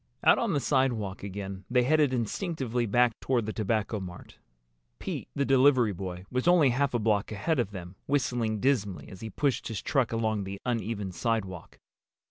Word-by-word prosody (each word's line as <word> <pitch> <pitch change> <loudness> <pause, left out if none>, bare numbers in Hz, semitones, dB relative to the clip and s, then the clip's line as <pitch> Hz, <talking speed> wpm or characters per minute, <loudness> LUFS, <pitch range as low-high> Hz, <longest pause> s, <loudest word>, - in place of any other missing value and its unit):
Out - - +6
on 230 -6 0
the 145 - +2
sidewalk 125 -9 0
again 100 -1 -6
they 125 0 +3
headed 150 +1 +3
instinctively 125 - -1
back 120 +3 +4
toward 125 -4 0
the 110 - -3
Tobacco 110 0 -1
Mart. 90 -2 -10 0.6
Pete, - - -5
the 140 - +1
delivery 130 -5 +4
boy, 90 0 -6
was 125 +5 -1
only 170 -7 +6
half 135 +1 0
a - - +4
block 105 -2 +1
ahead 150 +8 0
of 120 - 0
them, 90 -2 -8
whistling 120 -6 0
dismally 105 -7 0
as 95 - -11
he 110 - -5
pushed 135 +5 -1
his 110 -4 -3
truck 135 -5 +1
along 110 -2 0
the 95 0 -6
uneven 115 -5 -2
sidewalk. 95 -4 -3
115 Hz, 175 wpm, -28 LUFS, 100-130 Hz, 0.6 s, Out